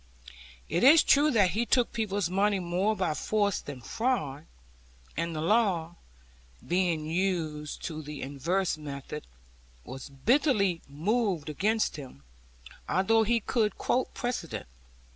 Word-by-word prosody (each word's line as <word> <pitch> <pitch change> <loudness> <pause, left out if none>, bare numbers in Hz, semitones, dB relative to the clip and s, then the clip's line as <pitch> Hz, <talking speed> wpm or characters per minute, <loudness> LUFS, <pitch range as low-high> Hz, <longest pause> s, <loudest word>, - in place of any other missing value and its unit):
It 170 +6 0
is 300 +5 +8
true 295 +2 +5
that 205 -9 +3
he 220 +6 0
took 240 0 +2
people's 205 -5 -1
money 200 +3 +2
more 185 +5 0
by 185 -6 0
force 205 +4 0
than 140 -3 -8
fraud; 160 - -2 0.7
and 170 -1 -2
the 155 - -2
law 180 -4 +2 0.7
(being 175 -3 +1
used 160 -3 -2
to 155 -2 -4
the 150 -1 -7
inverse 155 +6 -1
method) 145 0 -7 0.6
was 135 +2 -8
bitterly 200 - +2
moved 180 +1 -1
against 210 +6 0
him, 130 - -10 0.7
although 225 +5 +3
he 230 +1 +2
could 215 -2 0
quote 255 - 0
precedent. 240 - -3
185 Hz, 125 wpm, -29 LUFS, 155-220 Hz, 0.7 s, is